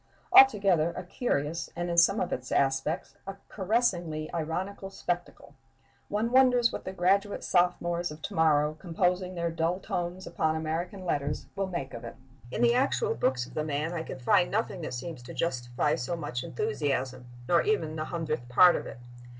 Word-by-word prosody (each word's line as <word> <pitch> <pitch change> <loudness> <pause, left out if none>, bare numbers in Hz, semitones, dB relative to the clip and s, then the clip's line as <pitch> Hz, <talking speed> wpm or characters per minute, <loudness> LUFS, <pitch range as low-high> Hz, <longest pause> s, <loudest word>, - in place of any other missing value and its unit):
Altogether, 195 -10 +6
a - - -4
curious, 165 - -2
and, 175 +1 -2
in 170 - -2
some 170 +5 +5
of 180 - -1
its 130 +1 -5
aspects, 135 +2 0
a 195 - -5
caressingly 180 -7 -1
ironical 185 +5 -3
spectacle. 175 -2 -5 0.6
One 220 +3 -1
wonders 250 -2 +5
what - - -6
the - - -4
graduate 195 +3 +1
sophomores 175 -1 +1
of 150 +1 -9
to - - -5
morrow, 155 -2 +3
composing 180 +1 0
their 170 -1 -1
dull 165 +3 0
tomes 180 0 -4
upon 160 0 0
American 170 +4 -3
letters, 145 -3 -2
will 195 -1 -1
make 170 -7 -5
of 115 - -7
it.... 115 - -8 0.3
In - - -1
the 235 0 +5
actual 285 - +1
books 130 - 0
of - - -14
the 155 - -1
man 155 +2 -2
I 170 - -2
can 160 - -7
find 175 - +3
nothing 205 -4 -2
that 155 - -4
seems 130 +2 -6
to 120 - -10
justify 120 -7 -1
so 130 +8 -2
much 130 -7 -4
enthusiasm, 135 - -2 0.2
nor 170 +2 +4
even 160 -8 0
the 155 0 -3
hundredth 155 -7 -3
part 175 +8 +7
of - - -4
it. - - -9
170 Hz, 180 wpm, -28 LUFS, 150-190 Hz, 0.6 s, part